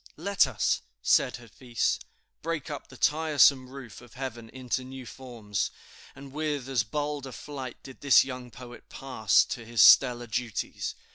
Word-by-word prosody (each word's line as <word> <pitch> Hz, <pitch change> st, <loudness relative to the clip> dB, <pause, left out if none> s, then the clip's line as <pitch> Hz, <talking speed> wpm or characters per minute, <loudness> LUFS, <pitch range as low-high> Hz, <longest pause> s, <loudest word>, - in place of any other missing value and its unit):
"Let 195 Hz, -1 st, +2 dB
us," 130 Hz, -, 0 dB, 0.2 s
said 130 Hz, -, +3 dB
Hafiz, 120 Hz, 0 st, -2 dB, 0.4 s
"break 160 Hz, -3 st, -4 dB
up 145 Hz, -, -7 dB
the 130 Hz, -, -14 dB
tiresome 145 Hz, -4 st, +3 dB
roof 130 Hz, -5 st, -10 dB
of 120 Hz, -2 st, -16 dB
heaven 120 Hz, -4 st, -6 dB
into 130 Hz, 0 st, -3 dB
new 130 Hz, 0 st, -9 dB
forms," 115 Hz, -5 st, -4 dB, 0.5 s
and 135 Hz, 0 st, -12 dB
with 150 Hz, -3 st, -3 dB
as 130 Hz, -3 st, +1 dB
bold 145 Hz, +4 st, -3 dB
a -, -, -8 dB
flight 130 Hz, -3 st, -7 dB
did 135 Hz, -, -12 dB
this 140 Hz, -2 st, +6 dB
young 125 Hz, -2 st, -7 dB
poet 120 Hz, 0 st, -12 dB
pass 120 Hz, -7 st, +2 dB
to 120 Hz, -, -6 dB
his 115 Hz, 0 st, +3 dB
"stellar 120 Hz, -2 st, +6 dB
duties." 120 Hz, -3 st, -4 dB
130 Hz, 155 wpm, -28 LUFS, 120-140 Hz, 0.5 s, this